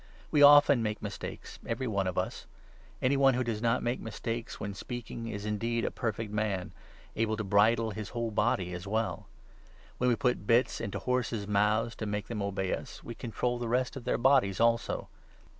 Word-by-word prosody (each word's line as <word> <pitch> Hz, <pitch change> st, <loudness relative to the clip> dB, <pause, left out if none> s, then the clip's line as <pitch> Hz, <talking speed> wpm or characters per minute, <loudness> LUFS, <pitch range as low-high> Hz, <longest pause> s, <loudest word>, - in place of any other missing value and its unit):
We 145 Hz, -, +3 dB
often 145 Hz, -3 st, +8 dB
make 105 Hz, -1 st, -2 dB
mistakes, -, -, -7 dB
2 -, -, -13 dB
every 125 Hz, +3 st, -2 dB
one 100 Hz, -5 st, 0 dB
of 90 Hz, -, -3 dB
us. -, -, -3 dB, 0.6 s
Any 130 Hz, +2 st, +3 dB
one 135 Hz, -2 st, +4 dB
who 130 Hz, -, +1 dB
does 115 Hz, -3 st, -3 dB
not 115 Hz, +2 st, +1 dB
make 120 Hz, +2 st, -1 dB
mistakes 115 Hz, +1 st, -5 dB
when 100 Hz, -1 st, -4 dB
speaking 115 Hz, +2 st, -6 dB
is 105 Hz, -2 st, -5 dB
indeed 115 Hz, +2 st, -1 dB
a -, -, -1 dB
perfect 110 Hz, -2 st, -3 dB
man, 105 Hz, -4 st, -1 dB, 0.4 s
able 110 Hz, -1 st, 0 dB
to 110 Hz, -, -2 dB
bridle 110 Hz, +3 st, +3 dB
his 105 Hz, 0 st, -6 dB
whole 115 Hz, -2 st, -3 dB
body 105 Hz, -4 st, 0 dB
as 90 Hz, +2 st, -6 dB
well. 110 Hz, +2 st, -2 dB, 0.7 s
When 125 Hz, -, +3 dB
we 120 Hz, -, +3 dB
put 125 Hz, -5 st, 0 dB
bits 120 Hz, +2 st, +3 dB
into 100 Hz, -3 st, -3 dB
horses' 120 Hz, -1 st, -1 dB
mouths, 105 Hz, +3 st, +2 dB
to 110 Hz, -, -4 dB
make 105 Hz, 0 st, -3 dB
them 115 Hz, -3 st, -3 dB
3 100 Hz, -, -1 dB
obey 95 Hz, -1 st, -1 dB
us, -, -, -6 dB
we 120 Hz, -, -6 dB
control 120 Hz, +1 st, -2 dB
the 120 Hz, -, -3 dB
rest 125 Hz, +3 st, 0 dB
of 130 Hz, -3 st, -8 dB
their 125 Hz, -, +1 dB
bodies 125 Hz, -6 st, +3 dB
also. 115 Hz, 0 st, +1 dB
115 Hz, 200 wpm, -30 LUFS, 105-120 Hz, 0.7 s, often